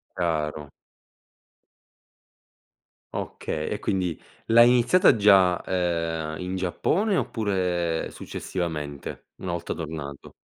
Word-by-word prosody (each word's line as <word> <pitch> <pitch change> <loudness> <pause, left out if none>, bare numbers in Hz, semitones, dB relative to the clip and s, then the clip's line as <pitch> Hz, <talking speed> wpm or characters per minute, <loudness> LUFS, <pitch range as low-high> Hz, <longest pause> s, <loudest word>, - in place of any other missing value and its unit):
Chiaro. 75 -4 -2 2.4
Okay. 75 0 -4
E - - -3
quindi 90 -4 -1 0.3
l'hai 120 +1 +7
iniziata 125 +5 +5
già, 95 -3 +5
ehm, 85 -3 -1
in 90 +1 -3
Giappone 180 - 0
oppure 90 - -1
successivamente 75 -6 -5
una 95 - -3
volta 85 -1 -3
tornato? 75 -4 -7
90 Hz, 85 wpm, -25 LUFS, 80-95 Hz, 2.4 s, l'hai